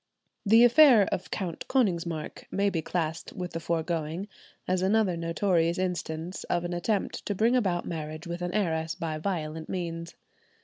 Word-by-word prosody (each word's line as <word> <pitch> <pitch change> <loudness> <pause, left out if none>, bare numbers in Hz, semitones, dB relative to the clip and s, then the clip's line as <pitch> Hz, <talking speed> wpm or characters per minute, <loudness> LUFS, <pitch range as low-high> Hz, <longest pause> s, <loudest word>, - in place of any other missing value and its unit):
The 225 +3 +6
affair 245 -2 +8
of 185 - -3
Count 180 -5 -4
Konigsmark 170 - -1
may 200 +1 +1
be 165 - -1
classed 160 -1 -3
with 180 -1 -5
the 165 - -4
foregoing, 165 +2 -2 0.4
as 185 0 +1
another 195 -1 +2
notorious 170 0 +1
instance 175 -1 -3
of 175 0 0
an 175 - -3
attempt 195 +4 -1
to 205 - -1
bring 230 +5 +3
about 185 -8 +1
marriage 155 -1 -5
with 170 +1 -5
an 175 0 -2
heiress 165 -5 0
by 155 -2 -3
violent 160 -3 -3
means. 170 -2 -4
175 Hz, 160 wpm, -28 LUFS, 165-195 Hz, 0.4 s, affair